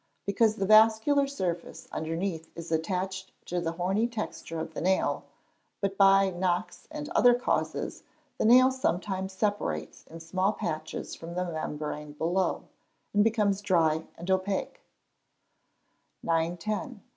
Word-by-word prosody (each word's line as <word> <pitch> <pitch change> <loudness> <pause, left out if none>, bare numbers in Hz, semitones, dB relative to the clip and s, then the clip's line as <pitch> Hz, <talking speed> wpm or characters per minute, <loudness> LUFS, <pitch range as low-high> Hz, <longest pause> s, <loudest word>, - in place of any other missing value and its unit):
_ - - -45 0.2
Because 215 +2 +2
the 195 - -1
vascular 220 +7 +5
surface 180 -11 -4
underneath 165 +1 -3
is 170 0 -8
attached 185 +3 -2
to 175 0 -2
the 165 -1 -2
horny 190 +6 +1
texture 215 -7 -5
of 160 0 -5
the - - -4
nail; 190 +2 +1 0.5
but 200 -1 -1
by 195 -1 +5
knocks 180 +2 -2
and 300 -1 -6
other 245 -1 +5
causes, 245 - -2 0.4
the - - +1
nail 255 +3 +7
sometimes 190 -6 -1
separates 205 +2 -2
in 165 - -10
small 185 +5 0
patches 155 -4 -4
from 170 +1 -8
the 180 0 0
membrane 150 -2 -4
below, 175 +5 0 0.5
and 205 0 +5
becomes 210 -3 +2
dry 165 -5 +2
and 175 +3 -4
opaque. 195 - -1 1.4
910. 175 +7 -2
190 Hz, 135 wpm, -28 LUFS, 165-215 Hz, 1.4 s, nail